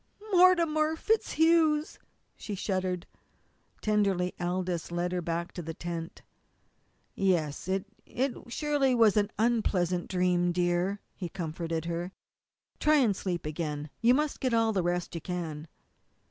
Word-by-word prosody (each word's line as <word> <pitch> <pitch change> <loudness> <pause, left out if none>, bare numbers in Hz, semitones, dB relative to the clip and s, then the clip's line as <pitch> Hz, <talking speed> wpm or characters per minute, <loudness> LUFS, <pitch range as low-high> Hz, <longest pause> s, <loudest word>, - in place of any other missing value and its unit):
"Mortimer 335 -4 +4
FitzHugh's," 320 -6 +2 0.4
she 205 - -6
shuddered. 185 -2 -2 0.8
Tenderly 200 -4 +1
Aldous 175 -1 -2
led 175 +1 -1
her 180 -1 -1
back 170 +1 -3
to 175 - -6
the 165 -1 -6
tent. 170 -1 -6 0.9
"Yes, 170 -7 0
it 190 +1 0 0.2
was 250 -2 -3
surely 290 -2 +1
an 215 -3 +4
unpleasant 190 -6 +1
dream, 180 -1 +2
dear," 180 +3 0
he 180 -3 -6
comforted 165 -1 -4
her. 170 +2 -3 0.7
"Try 305 0 +4
and 240 -9 +3
sleep 180 -4 -3
again. 150 -1 -4
You 240 +2 +5
must 300 +1 -1
get 255 -3 +1
all 225 -1 +3
the 190 - +1
rest 175 +1 -1
you 165 - -4
can." 165 -3 -5
185 Hz, 130 wpm, -29 LUFS, 175-235 Hz, 0.9 s, You